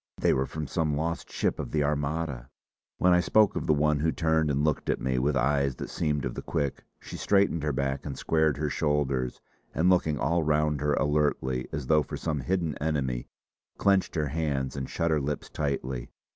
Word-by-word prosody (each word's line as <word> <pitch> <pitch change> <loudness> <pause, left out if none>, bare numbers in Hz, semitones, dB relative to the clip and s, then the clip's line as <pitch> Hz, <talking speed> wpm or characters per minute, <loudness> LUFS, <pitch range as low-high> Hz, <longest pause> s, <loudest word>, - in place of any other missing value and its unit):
They - - +3
were 65 +1 0
from 80 -1 -5
some 75 0 -1
lost 85 +2 -3
ship - - -1
of - - -4
the 75 -1 +1
Armada!" 70 -3 -2 0.5
When 90 0 +4
I 90 - +5
spoke 105 +4 +3
of - - -3
the 75 - +5
one 75 0 +2
who 80 +2 +2
turned 80 -2 +1
and 70 0 +1
looked 75 -1 0
at - - +1
me 65 0 0
with 70 +2 +1
eyes 70 0 +1
that - - -7
seemed 75 -4 -1
of - - -3
the - - -5
quick, 70 -2 -2 0.2
she - - -9
straightened 100 -5 +2
her 75 0 0
back 70 0 -2
and 70 -2 -5
squared 80 -2 +1
her 75 -1 -1
shoulders, 70 -4 0 0.3
and 90 +4 +4
looking 80 -5 +2
all 85 +6 +1
round 75 -1 +1
her 75 0 +2
alertly 75 -4 0
as 70 - -4
though 75 +2 +4
for 70 - -5
some 75 -3 -2
hidden 85 +1 -1
enemy, 70 -5 -1 0.5
clenched 100 -2 +2
her 75 -3 0
hands 70 -4 -1
and 70 -1 -4
shut 85 0 0
her 75 -2 +2
lips 70 +1 -4
tightly. 65 -4 -3
75 Hz, 205 wpm, -28 LUFS, 70-80 Hz, 0.5 s, I